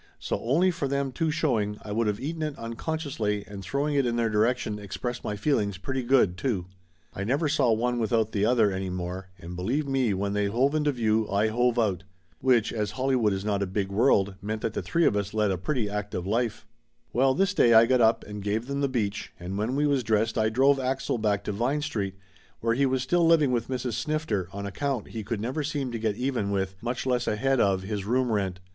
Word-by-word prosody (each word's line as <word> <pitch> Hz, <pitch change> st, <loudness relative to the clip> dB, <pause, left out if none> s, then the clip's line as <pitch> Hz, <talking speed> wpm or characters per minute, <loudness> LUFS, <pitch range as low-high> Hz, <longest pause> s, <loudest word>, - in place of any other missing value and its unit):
So -, -, -3 dB
only 165 Hz, +11 st, +3 dB
for 165 Hz, -5 st, -2 dB
them 140 Hz, 0 st, -1 dB
two 160 Hz, +5 st, -1 dB
show 150 Hz, -6 st, +1 dB
ing, 105 Hz, 0 st, -2 dB
I 105 Hz, -, -7 dB
would 115 Hz, +1 st, +1 dB
of 105 Hz, 0 st, -1 dB
eaten 160 Hz, +4 st, -4 dB
it 150 Hz, -2 st, -3 dB
unconsciously, 115 Hz, -4 st, -3 dB
and 100 Hz, -1 st, -8 dB
throwing 140 Hz, +9 st, -1 dB
it 140 Hz, -1 st, +3 dB
in 120 Hz, -2 st, 0 dB
their 115 Hz, -2 st, +1 dB
direction 110 Hz, 0 st, +1 dB
expressed 120 Hz, +5 st, -5 dB
my 105 Hz, -, -2 dB
feelings 105 Hz, -4 st, 0 dB
pretty 130 Hz, +7 st, -3 dB
good, 120 Hz, -8 st, +3 dB
too. 95 Hz, -5 st, -1 dB, 0.5 s
I 100 Hz, -, -4 dB
never 140 Hz, +9 st, +1 dB
saw 140 Hz, -5 st, +2 dB
one 120 Hz, +2 st, +1 dB
without 110 Hz, -1 st, +1 dB
the 100 Hz, -, 0 dB
other 110 Hz, -2 st, +4 dB
any 95 Hz, 0 st, -3 dB
more, 90 Hz, +1 st, -5 dB
and 85 Hz, +1 st, -8 dB
believe 125 Hz, +12 st, -1 dB
me 130 Hz, -7 st, +1 dB
when 100 Hz, +1 st, -1 dB
they 105 Hz, 0 st, +1 dB
hove 125 Hz, +7 st, +2 dB
into 150 Hz, -1 st, +2 dB
view 110 Hz, -4 st, +1 dB
I 100 Hz, +2 st, +2 dB
hove 120 Hz, +2 st, +1 dB
out. 100 Hz, -6 st, +1 dB, 0.4 s
Which, 125 Hz, -4 st, +2 dB
as 105 Hz, -2 st, -1 dB
Hollywood 130 Hz, -5 st, +2 dB
is 95 Hz, +1 st, -3 dB
not 100 Hz, -2 st, 0 dB
a 100 Hz, -, 0 dB
big 95 Hz, +1 st, -2 dB
world, 100 Hz, -3 st, +3 dB
meant 110 Hz, +1 st, -4 dB
that 110 Hz, -, -1 dB
the -, -, -2 dB
three 170 Hz, -1 st, +1 dB
of -, -, +3 dB
us 100 Hz, +1 st, -2 dB
led 105 Hz, -2 st, +2 dB
a 95 Hz, -, 0 dB
pretty 120 Hz, -, -1 dB
active 100 Hz, -3 st, -4 dB
life. 115 Hz, +1 st, -1 dB, 0.5 s
Well, 130 Hz, +2 st, +3 dB
this 195 Hz, +1 st, +2 dB
day 120 Hz, -, +5 dB
I 110 Hz, +1 st, +8 dB
got 125 Hz, +1 st, +3 dB
up 115 Hz, 0 st, +4 dB
and 105 Hz, 0 st, -7 dB
gave 105 Hz, +3 st, -1 dB
them 140 Hz, +1 st, -3 dB
the 140 Hz, -, +1 dB
beach, 105 Hz, -6 st, -2 dB
and 90 Hz, +2 st, -5 dB
when 110 Hz, +6 st, -1 dB
we 145 Hz, +1 st, +2 dB
was 140 Hz, -3 st, +2 dB
dressed 110 Hz, 0 st, +1 dB
I 110 Hz, -1 st, +2 dB
drove 135 Hz, +5 st, +3 dB
Axel 130 Hz, -2 st, -1 dB
back 105 Hz, -2 st, 0 dB
to -, -, -3 dB
Vine 125 Hz, +8 st, 0 dB
Street, 100 Hz, -10 st, -3 dB, 0.4 s
where 115 Hz, 0 st, +1 dB
he 135 Hz, +3 st, +2 dB
was 130 Hz, -1 st, 0 dB
still 170 Hz, +5 st, +2 dB
living 155 Hz, -5 st, +4 dB
with 120 Hz, -2 st, 0 dB
Mrs. 125 Hz, -2 st, -3 dB
Snifter 115 Hz, -, -1 dB
on 100 Hz, 0 st, -5 dB
account 130 Hz, +3 st, -3 dB
he 110 Hz, -2 st, -5 dB
could 110 Hz, +1 st, -3 dB
never 125 Hz, +8 st, -2 dB
seem 145 Hz, -3 st, -2 dB
to 115 Hz, -, -4 dB
get 110 Hz, -2 st, 0 dB
even 125 Hz, -4 st, -1 dB
with, 95 Hz, -1 st, -1 dB
much 120 Hz, +2 st, -3 dB
less 125 Hz, -2 st, 0 dB
ahead, 135 Hz, +5 st, +1 dB
of 95 Hz, -3 st, +2 dB
his 100 Hz, 0 st, -3 dB
room 125 Hz, +3 st, +1 dB
rent. 95 Hz, -4 st, -1 dB
115 Hz, 235 wpm, -27 LUFS, 105-135 Hz, 0.5 s, I